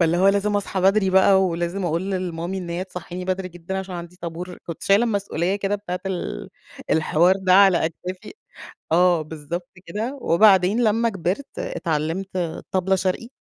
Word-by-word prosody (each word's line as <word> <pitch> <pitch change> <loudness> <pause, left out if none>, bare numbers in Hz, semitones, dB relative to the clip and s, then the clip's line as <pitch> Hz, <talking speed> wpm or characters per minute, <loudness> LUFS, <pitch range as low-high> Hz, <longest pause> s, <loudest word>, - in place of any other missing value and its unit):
فاللي 170 0 +3
هو 190 +2 +4
لازم 200 +1 +2
أصحى 195 -2 -2
بدري 195 0 +3
بقى 190 0 +5
ولازم 175 +2 -2
أقول 170 0 0 0.3
لMommy 165 - -7 0.2
إن 180 -2 -5
هي 175 +2 -2
تصحيني 180 -1 -7
بدري 185 0 -2
جدًا 175 +2 -6
عشان 190 -1 -6
عندي 175 +1 -8
طابور، 175 +1 -7
كنت 170 - -7
شايلة 200 +4 +4
المسؤولية 200 -4 -1
كده 200 0 -1
بتاعة 190 -3 -4
ال 180 - -4 0.4
الحوار 160 +3 +3
ده 190 -1 +2
على 195 -3 +6
أكتافي، 180 +4 -7 0.6
آه 175 0 +4
بالضبط 160 +3 -6 0.2
كده، 225 +10 -4
وبعدين 195 +4 +4
لما 230 +1 +2
كبرت 195 +6 -4
اتعلمت 165 +4 -2 0.3
طبلة 190 0 +2
شرقي. 190 +4 -2
185 Hz, 160 wpm, -23 LUFS, 170-195 Hz, 0.6 s, على